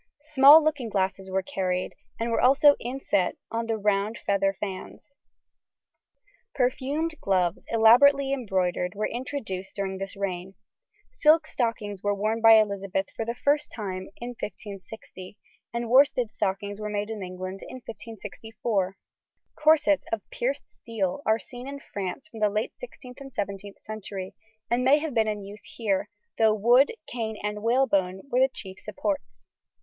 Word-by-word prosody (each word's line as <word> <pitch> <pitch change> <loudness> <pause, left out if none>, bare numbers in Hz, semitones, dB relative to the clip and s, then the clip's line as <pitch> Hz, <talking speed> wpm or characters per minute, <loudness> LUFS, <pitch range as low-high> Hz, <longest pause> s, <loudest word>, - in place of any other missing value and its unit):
Small 285 +3 +9
looking 290 -7 0
glasses 190 -1 -1
were 190 0 0
carried, 185 -1 -2 0.3
and 230 +1 -1
were - - +1
also 280 +3 +6
inset 240 -7 -1 0.2
on 230 0 -2
the 225 -1 0
round 210 +1 0
feather 195 -1 0
fans. 200 +7 -7 1.4
Perfumed 280 +5 0
gloves, 180 -3 0
elaborately 270 +5 +6
embroidered, 185 -6 -1
were 215 +1 -1
introduced 230 -7 -5
during 190 -1 -3
this 195 +1 -6
reign. 190 -1 -4 0.6
Silk 320 -8 +4
stockings 220 -8 -2
were 205 0 0
worn 215 +3 -1
by 225 0 +9
Elizabeth 200 -3 +2
for 225 - -3
the 235 +1 -3
first 290 +3 +1
time 190 -4 -5
in 240 - -6
1560, 205 -3 -9 0.3
and 235 0 -3
worsted 250 -2 +4
stockings 200 +2 -2
were 210 0 -4
made 205 +1 -2
in 215 -2 -5
England 185 +1 -6
in - - -9
1564. 220 -4 -4 0.6
Corsets 305 -1 +3
of 220 -3 -3
pierced 275 +4 -2
steel 215 -2 -3
are 220 0 +4
seen 245 +2 -9
in 280 0 -6
France 200 +5 -6
from 230 -7 -11
the 210 -1 +3
late 215 +2 -2
16th 260 - -11
and 270 -1 -9
17th 200 -2 -5
century, 200 -3 -7 0.3
and 240 +2 +1
may 270 +3 +6
have 305 -2 -3
been 225 -2 +2
in 210 -1 -2
use 200 +2 -11
here, 205 -5 -1 0.3
though 220 -1 +5
wood, 240 - +5
cane, 220 -3 -4
and 210 0 -3
whalebone 200 -6 +1
were 250 - +2
the 265 +1 +5
chief 190 -6 -9
supports. 290 0 -4
220 Hz, 150 wpm, -26 LUFS, 195-250 Hz, 1.4 s, Small